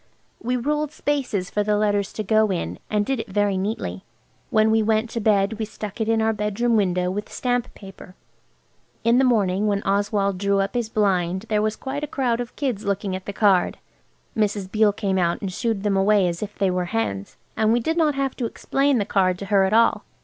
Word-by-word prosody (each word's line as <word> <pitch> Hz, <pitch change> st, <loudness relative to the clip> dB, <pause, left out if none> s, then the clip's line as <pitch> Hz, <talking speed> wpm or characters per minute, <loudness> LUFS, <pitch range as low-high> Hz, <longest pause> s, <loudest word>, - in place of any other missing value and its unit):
We 250 Hz, +2 st, -1 dB
ruled 295 Hz, +4 st, -1 dB
spaces 260 Hz, -12 st, -2 dB
for 210 Hz, -, 0 dB
the 210 Hz, 0 st, +1 dB
letters 205 Hz, -1 st, +1 dB
to 215 Hz, -, -3 dB
go 215 Hz, +1 st, +3 dB
in, 90 Hz, -, -3 dB
and 210 Hz, -1 st, +1 dB
did 270 Hz, 0 st, -1 dB
it -, -, -5 dB
very 205 Hz, 0 st, +1 dB
neatly. 185 Hz, -, -3 dB, 0.5 s
When 215 Hz, 0 st, +3 dB
we 220 Hz, 0 st, +3 dB
went 220 Hz, +1 st, +1 dB
to 230 Hz, -, -2 dB
bed 210 Hz, 0 st, +2 dB
we 220 Hz, -, -1 dB
stuck 210 Hz, 0 st, -7 dB
it 220 Hz, -, 0 dB
in 225 Hz, -1 st, +2 dB
our 220 Hz, 0 st, +2 dB
bedroom 210 Hz, +3 st, 0 dB
window 180 Hz, -3 st, +1 dB
with 205 Hz, +2 st, -5 dB
stamp 245 Hz, -1 st, -1 dB
paper. 195 Hz, -2 st, -12 dB, 0.9 s
In 235 Hz, +2 st, +4 dB
the -, -, +4 dB
morning 210 Hz, -5 st, +2 dB
when 200 Hz, -1 st, 0 dB
Oswald 200 Hz, -1 st, 0 dB
drew 200 Hz, 0 st, +1 dB
up 195 Hz, 0 st, -1 dB
his 240 Hz, -3 st, -1 dB
blind 190 Hz, -2 st, 0 dB
there 210 Hz, -1 st, +2 dB
was 215 Hz, 0 st, 0 dB
quite 280 Hz, +4 st, -5 dB
a -, -, -2 dB
crowd 245 Hz, -4 st, -1 dB
of 240 Hz, -, -8 dB
kids 255 Hz, -8 st, -2 dB
looking 200 Hz, -1 st, -2 dB
at 185 Hz, -, -8 dB
the -, -, -2 dB
card. 200 Hz, -3 st, +2 dB, 0.6 s
Mrs. 205 Hz, -3 st, -1 dB
Beale 215 Hz, -1 st, +4 dB
came 200 Hz, -2 st, -1 dB
out 170 Hz, -1 st, +1 dB
and 190 Hz, -2 st, -4 dB
shoo 235 Hz, -, -2 dB
ed 210 Hz, -3 st, -2 dB
them 205 Hz, -2 st, +1 dB
away 195 Hz, 0 st, +3 dB
as 170 Hz, -1 st, -3 dB
if 210 Hz, -1 st, -6 dB
they 195 Hz, -2 st, +1 dB
were 180 Hz, 0 st, -1 dB
hens. 135 Hz, -, -3 dB, 0.2 s
And 220 Hz, 0 st, +2 dB
we 235 Hz, -, +3 dB
did 320 Hz, +8 st, -1 dB
not 310 Hz, -4 st, +2 dB
have 275 Hz, -1 st, -1 dB
to 240 Hz, -, -1 dB
explain 275 Hz, +4 st, 0 dB
the 205 Hz, -, 0 dB
card 185 Hz, -3 st, +1 dB
to 200 Hz, -, -6 dB
her 195 Hz, -1 st, +5 dB
at 190 Hz, -, -1 dB
all. 230 Hz, +1 st, +3 dB
210 Hz, 225 wpm, -23 LUFS, 195-230 Hz, 0.9 s, her